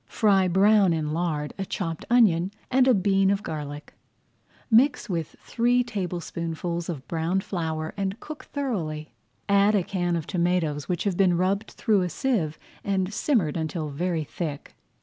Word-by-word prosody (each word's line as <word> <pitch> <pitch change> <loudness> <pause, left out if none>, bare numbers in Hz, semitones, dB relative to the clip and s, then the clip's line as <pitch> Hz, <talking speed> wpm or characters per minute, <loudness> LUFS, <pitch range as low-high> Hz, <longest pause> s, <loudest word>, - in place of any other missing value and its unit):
Fry 195 -4 +3
brown 195 0 +4
in 155 -2 -2
lard 155 -3 -2
a - - 0
chopped 165 -4 -4
onion 195 -7 +4 0.2
and 260 0 +4
a 260 - +6
bean 195 0 +3
of 200 +1 0
garlic. 145 -1 -6 0.8
Mix 250 +4 +4
with 165 -6 -3
three 245 +1 +2
tablespoonfuls 175 -5 -4
[Page - - -7
99] 170 - -2
of 130 - -18
browned 170 +3 -1
flour 160 -3 -3
and 195 +2 -3
cook 305 +3 -9
thoroughly. 170 - -3 0.3
Add 200 +1 +4
a 195 - +2
can 175 -2 -1
of 165 -3 -2
tomatoes 170 -5 0
which 175 -2 -1
have 195 -4 -1
been 185 -3 +4
rubbed 195 +4 0
through 210 -3 +2
a 180 - -1
sieve 180 - -1 0.3
and 195 0 -1
simmered 215 - +1
until 160 -1 -3
very 165 +2 -1
thick. 150 -1 -6
180 Hz, 165 wpm, -26 LUFS, 160-200 Hz, 0.8 s, a